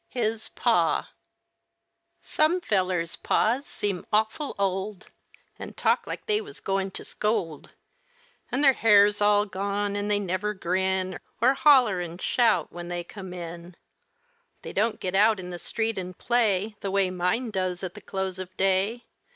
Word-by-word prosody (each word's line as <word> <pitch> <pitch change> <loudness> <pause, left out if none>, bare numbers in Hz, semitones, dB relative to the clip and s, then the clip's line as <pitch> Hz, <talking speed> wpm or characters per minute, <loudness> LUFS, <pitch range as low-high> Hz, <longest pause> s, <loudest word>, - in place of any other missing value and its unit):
HIS 225 -3 -2
PA - - +1 1.1
Some 315 +4 +2
fellers' 185 - 0
pas 250 +6 +1
seem 195 -3 -2
awful 220 +7 0
old, 195 0 -2 0.5
An' - - -7
talk - - +1
like - - -6
they 425 -1 +1
was 415 -1 -11
going 195 0 -1
to - - -9
scold, 180 -8 -2 0.8
An' 250 +3 0
their 275 -2 +6
hair's 205 -3 +4
all 205 0 +4
gone, 200 +1 -2
an' 205 0 -2
they 210 -1 +2
never 205 +2 -2
grin 185 0 -1 0.2
Or 250 +4 +4
holler 255 -10 +5
an' 175 0 -6
shout 190 -5 +2
when 175 0 -7
they 175 0 -3
come 190 +1 -9
in. 170 0 -8 0.9
They - - -7
don't 220 +2 0
get 185 -1 -3
out 210 +1 +4
in 180 -1 -7
the 175 - -6
street 225 +1 -2
an' 185 0 -6
play 215 -3 +1
The 200 - -4
way 195 -1 +1
mine 185 +7 -1
does 185 -2 -2
at 180 -2 -4
the - - -11
close 190 -1 -4
of 185 0 -8
day. 195 +5 +1
200 Hz, 160 wpm, -26 LUFS, 185-220 Hz, 1.1 s, their